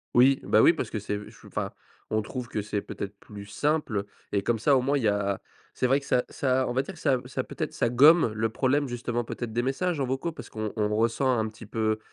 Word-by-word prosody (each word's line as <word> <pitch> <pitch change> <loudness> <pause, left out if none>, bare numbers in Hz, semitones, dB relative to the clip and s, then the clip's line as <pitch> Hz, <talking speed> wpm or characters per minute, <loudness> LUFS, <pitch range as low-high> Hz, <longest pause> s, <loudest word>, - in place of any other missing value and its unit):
Oui, 130 +2 +6
bah 110 - +4
oui, 165 - +7
parce 160 - -3
que 110 - -3
c'est 105 0 -3
u 105 0 -7
ch - - -18
enfin, - - -3 0.4
on 110 - +1
trouve 120 +2 -6
que 105 - -2
c'est 105 0 -2
peut-être 100 0 -7
plus 100 -1 -10
simple 120 -2 0 0.3
et 100 -1 +1
comme 115 +1 +1
ça, 140 +6 +4
au 130 - +3
moins, 140 +3 +1
il 135 - -2
y - - +3
a 100 -1 0 0.3
c'est 125 - +1
vrai 135 +3 +3
que - - -13
ça 125 -2 +2
ça 130 -1 0
on 120 - -2
va 130 - +2
dire 175 +6 -9
ça 145 -3 +2
m 125 - 0
ça 130 - -3
peut-être - - -4
ça - - +1
gomme 135 +1 +6
le 110 +1 0
problème, 135 +4 +1
justement 120 0 -2
peut-être, 115 -1 -5
des 120 - +1
messages 145 +4 -1
en - - +1
vocaux 135 +6 -2
parce - - -10
qu'on 110 -1 -4
on 105 -1 0
ressent 120 +3 +2
un 110 - 0
petit 110 +1 -11
peu 110 0 0
120 Hz, 260 wpm, -27 LUFS, 110-135 Hz, 0.4 s, oui